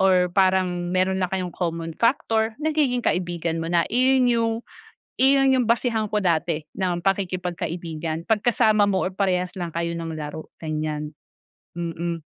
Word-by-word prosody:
or 185 -2 +4
parang 185 -2 +2
meron 185 +1 +2
lang 185 - -1
kayong 185 -1 -2
common 165 -2 -3
factor, 225 -2 +1
nagiging 295 -6 +1
kaibigan 170 -2 -1
mo - - -3
na. 170 -1 +3
Iyon 255 +1 +4
yung 230 -1 +2 0.7
iyon 270 0 +5
yung 235 - 0
basehan 230 -2 +1
ko 210 - +3
dati 165 -3 +1 0.2
ng 175 -2 -1
pakikipagkaibigan, 175 -4 -2
'pag 220 -2 +2
kasama 220 -4 +4
mo 190 -2 +1
or - - -1
parehas 185 -2 0
lang 175 -2 -3
kayo 170 0 -1
ng 165 -1 -5
laro, 150 +1 -6 0.2
ganiyan. 155 -1 -3 0.7
Mm. 170 -1 -3
180 Hz, 150 wpm, -23 LUFS, 170-220 Hz, 0.7 s, iyon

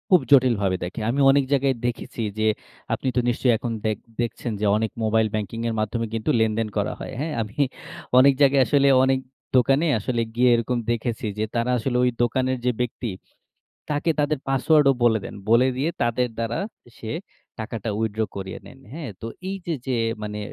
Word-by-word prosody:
খুব 185 - +7
জটিলভাবে 115 -8 +4
দেখে। 90 +6 -5
আমি 135 +4 0
অনেক 140 0 +3
জায়গায় 135 -1 +2
দেখেছি 120 -1 -3 0.2
যে, 110 - +2 0.5
আপনি - - -3
তো - - +3
নিশ্চয়ই 120 0 +2
এখন 120 +1 -4
দেক 110 -2 0 0.2
দেখছেন 120 +1 -3
যে, 105 - 0
অনেক 110 0 -1
মোবাইল 110 0 +2
ব্যাংকিং 110 +1 -3
এর - - -2
মাধ্যমে 115 +2 -1
কিন্তু 110 -1 -2
লেনদেন 110 0 +1
করা 100 - 0
হয়। - - -7
হ্যাঁ? 155 +2 -2
আমি 105 -1 -7 0.6
অনেক 135 +2 +7
জায়গায় 140 -1 +5
আসলে 140 -1 +3 0.2
অনেক 130 0 +3 0.4
দোকানে 135 +5 +4
আসলে 115 +3 -1
গিয়ে 125 +1 +4
এরকম 120 +1 -1
দেখেছি 115 0 -2
যে, 105 - 0
তারা 120 +1 +1
আসলে 125 +2 -1
ওই 125 - +4
দোকানের 130 +2 0
যে, 125 - +4
ব্যক্তি 120 0 -3 0.8
তাকে 150 +3 +1
তাদের 150 0 +1
পাসওয়ার্ডও 140 +1 +4
বলে 110 -2 +4
দেন। - - -7 0.2
বলে 120 +3 +6
দিয়ে 145 +6 0
তাদের 120 +1 +1
দ্বারা 115 0 -2 0.4
সে 110 - -6 0.5
টাকাটা 110 -1 -4
withdraw 110 0 -1
করিয়ে 95 -1 -5
নেন। 135 - -13
হ্যাঁ? 150 -5 -6
তো - - -5 0.2
এই 195 - -2
যে, 170 - 0
যে, 130 -2 0 0.3
মানে 105 0 -4
120 Hz, 180 wpm, -24 LUFS, 110-135 Hz, 0.8 s, খুব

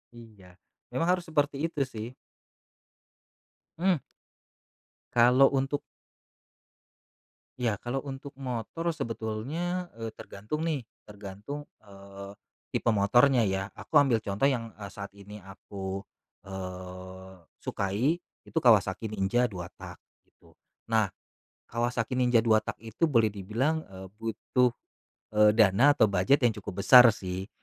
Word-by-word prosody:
Iya, 105 -6 -15 0.4
memang 165 - 0
harus 180 -1 0
seperti 145 0 0
itu 150 -4 -1
sih. 115 -4 -6 1.7
Mmm. 185 -1 +3 1.2
Kalau 125 +3 +6
untuk 135 +2 0 1.8
Iya, 120 -4 +1
kalau 130 +3 -3
untuk 140 0 -8
motor 135 +6 -3
sebetulnya, 145 +10 -3
eee, 115 -1 -5
tergantung 110 +12 -6
nih 155 -7 -1 0.2
tergantung, 105 +8 -8 0.2
eee. 100 -1 -11 0.3
tipe 115 - +1
motornya 120 +6 +4
ya. 95 0 -1
Aku 155 - 0
ambil 130 -6 +4
contoh 105 +5 -1
yang, 120 -5 +1
eee, 100 -2 -8
saat 100 0 -7
ini 105 +1 -11
aku, 95 0 -7 0.4
eee, 95 0 -8 0.2
sukai 120 - -1 0.2
itu - - -7
Kawasaki 110 -3 +3
Ninja 110 +4 +1
2-tak 90 -3 -9 0.3
gitu. - - -24 0.4
Nah 110 -4 +3 0.6
Kawasaki 120 +1 -1
Ninja 125 -2 +4
2-tak 110 -1 +1
itu 115 +9 -1
boleh 115 -8 +3
dibilang, 115 +11 -1
eee, 95 0 -10
butuh, 115 +3 0 0.6
eee, 105 0 +6
dana 115 +7 +5
atau - - +6
bujet 100 +7 +3
yang 115 - +3
cukup 100 0 -5
besar 125 +1 +10
sih. 95 -2 -4
115 Hz, 115 wpm, -28 LUFS, 100-135 Hz, 1.8 s, besar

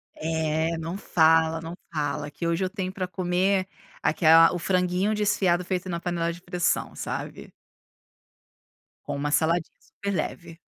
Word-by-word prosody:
É, 160 +1 -1
não 165 +3 -4
fala, 160 -3 +3
não 165 +2 -7 0.2
fala, 145 -1 -2
que 170 - -6
hoje 170 +2 0
eu 185 - 0
tenho 190 -2 -4
para 185 -1 -4
comer 185 +2 0 0.3
aquela 165 0 +6
o 175 - -2
franguinho 180 +3 +1
desfiado 195 -4 +2
feito 185 0 -3
na 170 - -2
panela 170 -1 -1
de 175 - -12
pressão, 180 -1 -1
sabe. - - -6 1.5
Com - - -4
uma 145 +1 -2
saladinha 165 +2 +1
super 200 0 -5
leve. 170 -1 -4
175 Hz, 145 wpm, -26 LUFS, 160-185 Hz, 1.5 s, aquela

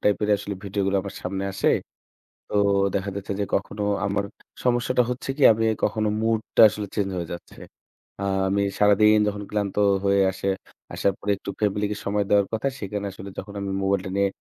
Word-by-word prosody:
type 105 - +3
এর 105 - +1
আসলে 100 0 -5
video 100 +1 -2
গুলো 100 0 +1
আমার 100 - -7
সামনে 95 +1 -3
আসে। - - +1 0.8
তো - - -10 0.4
দেখা 100 0 -1
যাচ্ছে 100 0 -5
যে, - - +1
কখনো 100 +1 -2 0.2
আমার 100 0 0 0.4
সমস্যাটা 125 0 +2
হচ্ছে 125 +2 -4
কি? - - -4
আমি 115 +1 0
এই 110 - -1
কখনো 110 -1 +1
mood 115 0 +2 0.2
টা - - +7
আসলে 105 0 -5
change 100 -2 0
হয়ে 85 -2 -3
যাচ্ছে। 85 - -11 0.6
আ - - -2 0.2
আমি 100 +1 +1 0.2
সারাদিন 105 +1 +5
যখন 105 0 -3
ক্লান্ত 100 -2 -2 0.3
হয়ে 100 0 +3
আসে, 95 +1 -5 0.5
আসার 100 - +1
পরে 100 - -1
একটু 100 - -8
family 105 0 +1
কে - - -2
সময় 100 +1 +1
দেওয়ার 100 -1 +4
কথা। 110 +5 0
সেখানে 100 0 -4
আসলে 95 +1 -9
যখন 100 +1 -7
আমি 100 - -3
mobile 95 0 +1
টা - - -4
নিয়ে, 100 0 +3
100 Hz, 200 wpm, -24 LUFS, 100-105 Hz, 0.8 s, টা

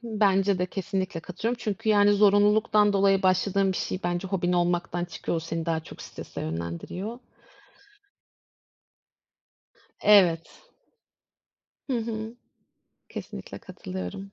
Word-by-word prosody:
Hı, 235 - -9
bence 195 -1 +3
de. 180 - 0
Kesinlikle 185 -2 -3
katılıyorum 215 +8 -3
çünkü, 220 0 -3
yani, 205 -1 +5
zorunluluktan 205 +1 +4
dolayı 195 -1 +3
başladığın 190 +1 +2
bir - - -4
şey 185 - -3
bence 175 +2 -1
hobin 180 -2 0
olmaktan 175 0 0
çıkıyor. 170 0 -4
O - - -1
seni 165 0 -4
daha 160 -1 0
çok - - -11
strese - - -8
yönlendiriyor. 85 - -5 2.8
Evet. 180 -6 +4 1.3
Hı 245 - +1
hı. 220 0 -4 0.7
Kesinlikle - - -8
katılıyorum. 95 - -7
195 Hz, 115 wpm, -26 LUFS, 175-205 Hz, 2.8 s, yani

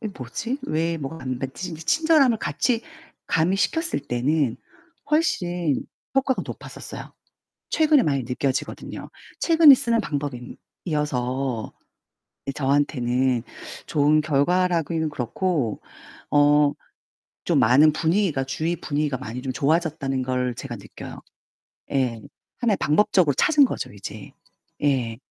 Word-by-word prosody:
'이게 215 -3 -5
뭐지? 230 - -4
왜 165 +2 -1
뭐가 150 +2 -6
안 130 -1 -3
맞지?' 135 +8 -5
이제 160 0 -8
친절함을 300 - +3
같이 235 +1 0 0.5
가미시켰을 195 - +1
때는 130 +1 +1 0.5
훨씬 175 - +1 0.3
효과가 270 -1 +1
높았었어요. - - -9 0.6
최근에 310 -4 +4
많이 140 - 0
느껴지거든요. 130 +2 -3 0.3
최근에 325 -4 +7
쓰는 235 -2 +1
방법이 140 - -5 0.3
이어서 130 - -2 0.8
저한테는 130 -3 +1 0.4
좋은 150 0 +3
결과라기는 165 +2 +1
그렇고 140 - -2 0.5
어 145 0 +4 0.8
좀 - - +3
많은 140 +7 +6
분위기가 165 -3 +1
주위 155 +6 -2
분위기가 150 -4 -2
많이 115 +1 -6
좀 130 -2 -3
좋아졌다는 145 -2 0
걸 125 -1 -1
제가 120 -1 -6
느껴요. 100 - -10 0.7
예. 125 -5 0 0.4
하나의 225 -5 +2
방법적으로 160 -1 +3
찾은 290 - +4
거죠 - - -4
이제. 100 - -9 0.5
예. 125 -6 +1
150 Hz, 275 characters per minute, -24 LUFS, 130-180 Hz, 0.8 s, 최근에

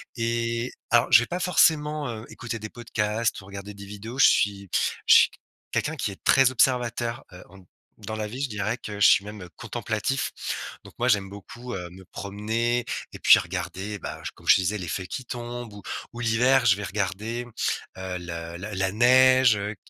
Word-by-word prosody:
Et 115 0 -1 0.2
alors, 120 0 +4
je - - +9
vais 120 - -1
pas 180 - -3
forcément, 155 -5 +2
heu, 110 -1 -6
écouter 115 -1 -6
des 110 - -7
podcasts 110 -1 -2
ou - - -15
regarder 100 +1 -8
des 100 0 -10
vidéos, 105 +5 -8
je 135 - +8
suis 100 -1 +1 0.4
je - - +8
suis - - +7 0.4
quelqu'un 160 +2 -1
qui 110 - -2
est 95 - -13
très 135 -1 +5
observateur, 120 0 +1
heu, 90 - -11 0.6
dans 110 - -6
la 110 -1 -3
vie, 125 +6 -6
je 135 - -1
dirais 105 +3 -2
que 105 -1 -7
je - - +8
suis 100 - +5
même, 105 -1 -8
heu, 90 - -11
contemplatif. - - -2 0.5
Donc - - -14
moi, - - +1
j'aime 100 -2 +2
beaucoup, 120 +5 -9
heu, 90 -2 -6
me 95 0 -13
promener 110 +5 -2 0.3
et - - -9
puis - - +8
regarder, 100 +2 -5
bah, - - -7
comme - - -17
je - - +8
te 95 - +2
disais 100 +4 -1
les 90 - -6
feuilles 90 +3 -4
qui 130 - -5
tombent, 120 -2 -6
ou 100 - -10 0.3
ou 120 - -8
l'hiver, 120 +3 +3
je 100 -5 +6
vais 105 - -6
regarder, 105 +5 -3 0.5
heu, 95 -1 -4
le 85 -1 -7
la 100 +3 -6
la 95 0 0
neige, 130 +1 +6
heu, 105 +1 -4
110 Hz, 200 wpm, -25 LUFS, 100-120 Hz, 0.6 s, je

